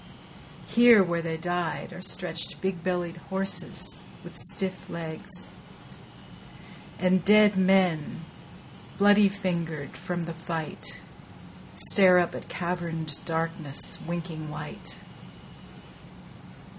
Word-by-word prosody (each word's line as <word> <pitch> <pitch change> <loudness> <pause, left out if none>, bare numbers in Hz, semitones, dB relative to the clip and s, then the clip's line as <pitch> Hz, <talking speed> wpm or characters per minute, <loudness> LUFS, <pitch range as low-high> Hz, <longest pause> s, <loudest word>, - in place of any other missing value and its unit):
Here 235 -3 +7
where 170 -2 -1
they 165 -1 -3
died 175 +1 -2
Are 180 - -8
stretched 170 -3 -4
big 190 -3 -2
bellied 175 -2 -1
horses 190 +3 -3 0.2
with - - -11
stiff 190 -2 -2
legs; 160 -2 -4 1.4
And 185 0 +3
dead 210 +1 +6
men, 185 -5 +3 0.8
bloody 205 0 +6
fingered 170 -7 -3
from 175 0 -3
the 170 0 -5
fight, 165 -1 -5 0.9
Stare 185 -3 +7
up 175 -1 +2
at - - -8
caverned 170 -4 -3
darkness 165 -3 -3
winking 165 -2 -4
white. 150 - -8
175 Hz, 95 wpm, -27 LUFS, 165-190 Hz, 1.4 s, Here